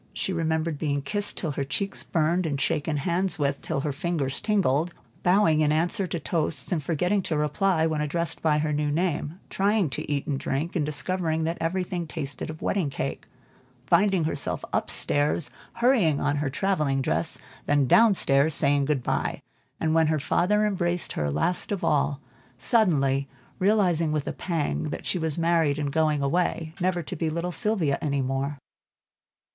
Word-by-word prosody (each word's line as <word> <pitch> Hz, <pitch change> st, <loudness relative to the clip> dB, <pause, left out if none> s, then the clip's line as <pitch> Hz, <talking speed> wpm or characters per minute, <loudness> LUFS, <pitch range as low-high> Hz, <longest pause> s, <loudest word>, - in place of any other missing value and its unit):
She 190 Hz, -, -2 dB
remembered 160 Hz, -2 st, -1 dB
being 145 Hz, -3 st, -1 dB
kissed 205 Hz, +6 st, -2 dB
till 160 Hz, -, -2 dB
her 140 Hz, -, -2 dB
cheeks 195 Hz, +9 st, -3 dB
burned, 170 Hz, +2 st, 0 dB
and 140 Hz, -3 st, -2 dB
shaken 150 Hz, +2 st, 0 dB
hands 180 Hz, +6 st, 0 dB
with 140 Hz, -2 st, -1 dB
till 155 Hz, -4 st, -2 dB
her 150 Hz, -, -1 dB
fingers 145 Hz, -3 st, -2 dB
tingled; 175 Hz, -6 st, +1 dB, 0.3 s
bowing 180 Hz, -4 st, +4 dB
in 150 Hz, -1 st, +3 dB
answer 175 Hz, +6 st, +1 dB
to 170 Hz, -, -3 dB
toasts, 155 Hz, -4 st, 0 dB
and 160 Hz, -5 st, 0 dB
forgetting 180 Hz, +6 st, +1 dB
to 160 Hz, -4 st, -2 dB
reply 160 Hz, +3 st, +1 dB
when 155 Hz, -2 st, 0 dB
addressed 160 Hz, +2 st, -2 dB
by 155 Hz, -2 st, +3 dB
the 150 Hz, 0 st, 0 dB
new 150 Hz, 0 st, 0 dB
name; 160 Hz, +1 st, -1 dB
trying 200 Hz, -5 st, +1 dB
to 130 Hz, -, -4 dB
eat 140 Hz, -1 st, -1 dB
and 140 Hz, -2 st, -2 dB
drink, 145 Hz, +6 st, -2 dB
and 150 Hz, -4 st, 0 dB
discovering 160 Hz, +2 st, -1 dB
that 165 Hz, +2 st, -2 dB
everything 175 Hz, 0 st, -2 dB
tasted 140 Hz, -4 st, -5 dB
of 155 Hz, 0 st, -8 dB
wedding 185 Hz, -7 st, 0 dB
cake; -, -, -4 dB, 0.6 s
finding 185 Hz, +3 st, +3 dB
herself 145 Hz, -3 st, -1 dB
up -, -, 0 dB
stairs 145 Hz, +1 st, +1 dB, 0.2 s
hurrying 235 Hz, -, +3 dB
on 145 Hz, 0 st, 0 dB
her 145 Hz, -1 st, -1 dB
travelling 150 Hz, -4 st, 0 dB
dress, 80 Hz, -4 st, 0 dB, 0.3 s
then 145 Hz, -1 st, +3 dB
down 225 Hz, -, +5 dB
stairs 140 Hz, 0 st, +3 dB
saying 140 Hz, -2 st, +3 dB
good 140 Hz, -3 st, 0 dB
by; -, -, -1 dB, 0.4 s
and 160 Hz, -1 st, +1 dB
when 160 Hz, -1 st, +4 dB
her 155 Hz, 0 st, +1 dB
father 210 Hz, +8 st, +2 dB
embraced 175 Hz, -4 st, -1 dB
her 75 Hz, -1 st, -1 dB
last 75 Hz, -, -1 dB
of 200 Hz, -, -2 dB
all, 140 Hz, -1 st, +1 dB, 0.4 s
suddenly 140 Hz, -, +2 dB, 0.3 s
realizing 185 Hz, -5 st, +2 dB
with 150 Hz, -2 st, -1 dB
a -, -, -3 dB
pang, 165 Hz, -3 st, -2 dB
that 150 Hz, -, -5 dB
she 180 Hz, -, 0 dB
was 160 Hz, -2 st, -1 dB
married 165 Hz, -3 st, +2 dB
and 145 Hz, -2 st, -2 dB
going 155 Hz, -3 st, +2 dB
away, 160 Hz, +1 st, 0 dB
never 175 Hz, -1 st, 0 dB
to 180 Hz, -, -6 dB
be 165 Hz, -1 st, -1 dB
little 170 Hz, +3 st, -2 dB
Sylvia 175 Hz, -8 st, 0 dB
any 140 Hz, -3 st, 0 dB
more. 135 Hz, +2 st, -2 dB
160 Hz, 175 wpm, -26 LUFS, 145-180 Hz, 0.6 s, down